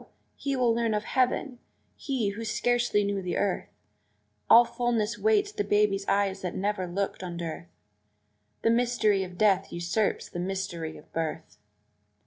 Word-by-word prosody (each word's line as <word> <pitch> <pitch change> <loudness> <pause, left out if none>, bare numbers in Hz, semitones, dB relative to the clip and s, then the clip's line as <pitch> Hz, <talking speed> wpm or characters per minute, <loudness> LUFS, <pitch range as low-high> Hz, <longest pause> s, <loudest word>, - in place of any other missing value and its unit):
he 275 -1 -2
will 245 -3 +3
learn 230 -1 0
of 210 - -1
heaven 255 +1 0 0.4
he, 255 -7 -1
who 210 +3 -6
scarcely 240 -1 +1
knew 200 -1 -1
the 180 -1 -2
earth. 200 -2 -1 0.8
All 235 +1 +9
fullness 235 -2 -1
waits 420 -2 +2
the 420 -1 -2
baby 205 - +2
eyes 195 -1 +1
that 180 -2 -4
never 195 -1 -1
looked 195 +3 -3
on 175 -2 -5
dearth 170 0 -5 1.0
The 225 - +4
mystery 230 -4 +2
of 180 -1 -9
death 195 -2 +3
usurps 175 +5 -1
the 175 - -6
mystery 180 -3 -4
of - - -17
birth! 160 -1 -4
205 Hz, 150 wpm, -28 LUFS, 185-235 Hz, 1.0 s, All